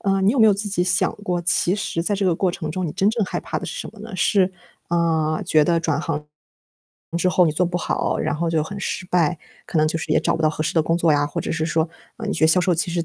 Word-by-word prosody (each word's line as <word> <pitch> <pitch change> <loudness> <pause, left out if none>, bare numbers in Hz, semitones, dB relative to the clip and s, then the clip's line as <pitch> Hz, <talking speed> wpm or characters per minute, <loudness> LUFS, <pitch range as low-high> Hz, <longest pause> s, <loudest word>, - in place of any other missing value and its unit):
呃， 195 -1 +1
你 195 - +4
有 270 - -1
没 220 - +7
有 210 - +5
自 205 +2 -1
己 195 -3 +1
想 185 +1 +2
过， 180 -4 -3
其 175 +1 +2
实 200 -4 -2
在 205 +4 0
这 200 0 -1
个 180 -3 +3
过 185 +2 +1
程 155 -3 -5
中 185 +3 -3
你 150 - -4
真 195 +2 +2
正 225 0 -1
害 - - -3
怕 - - -4
的 - - -7
是 - - -5
什 - - -6
么 220 - -16
呢？ 215 -2 -8
是， 190 +1 +3 0.4
呃， 160 -2 +1
觉 155 - +4
得 170 +1 +2
转 160 -2 0
行 150 -2 -3 0.9
之 175 - 0
后 180 0 +4
你 155 - +1
做 175 +4 +1
不 175 0 -2
好， - - -1
然 - - -1
后 165 +1 -1
就 160 -2 +1
很 200 +6 -6
失 190 -1 -4
败。 175 -2 +1 0.3
可 165 - -1
能 155 - +4
就 165 - -2
是 165 - -6
也 - - +3
找 - - +1
不 160 - -3
到 155 - +4
合 155 - -3
适 155 - -2
的 160 - +4
工 165 +2 +1
作 170 -2 +2
呀， 145 0 +2
或 145 - -4
者 - - -4
是 160 -1 -1
说， 160 0 0 0.3
嗯， 220 -2 -5
你 - - 0
觉 160 - +2
得 - - +5
销 180 +3 +4
售 180 0 +2
其 170 +1 0
实 170 -1 -1
175 Hz, 325 characters per minute, -22 LUFS, 160-190 Hz, 0.9 s, 没